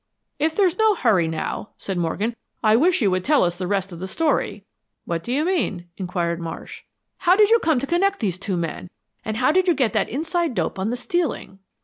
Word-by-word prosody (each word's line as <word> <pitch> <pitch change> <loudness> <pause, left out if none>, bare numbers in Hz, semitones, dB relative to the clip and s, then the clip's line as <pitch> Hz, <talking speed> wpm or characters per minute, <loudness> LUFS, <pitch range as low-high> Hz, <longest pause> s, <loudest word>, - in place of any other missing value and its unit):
"If 315 +2 +1
there's 370 -3 +2
no 440 -1 +4
hurry 205 - +2
now," 160 +5 -4
said 195 - -4
Morgan, 190 +7 -1 0.3
"I 215 0 +5
wish 320 +2 +3
you 200 - +3
would 185 0 0
tell 300 +4 +4
us 175 -1 0
the 180 0 -4
rest 195 0 -1
of 170 - -8
the 190 - -4
story." 210 - -1 0.4
"What 165 -1 -3
do 240 - -5
you 290 +5 +1
mean?" 205 - -1
inquired 175 -3 -2
Marsh. 165 -1 -7 0.4
"How 360 0 +4
did 420 +1 +5
you 465 - +6
come 320 -7 +2
to 270 - -2
connect 390 +6 +1
these 185 -5 -2
two 195 -2 -2
men, 170 +1 -4 0.3
and 220 0 -3
how 255 +4 +3
did 370 +2 +2
you 350 - +4
get 255 -5 +1
that 215 -3 +1
inside 320 - -1
dope - - -2
on 195 +3 -1
the 245 - -2
stealing?" 315 - -2
225 Hz, 225 wpm, -22 LUFS, -, 0.4 s, you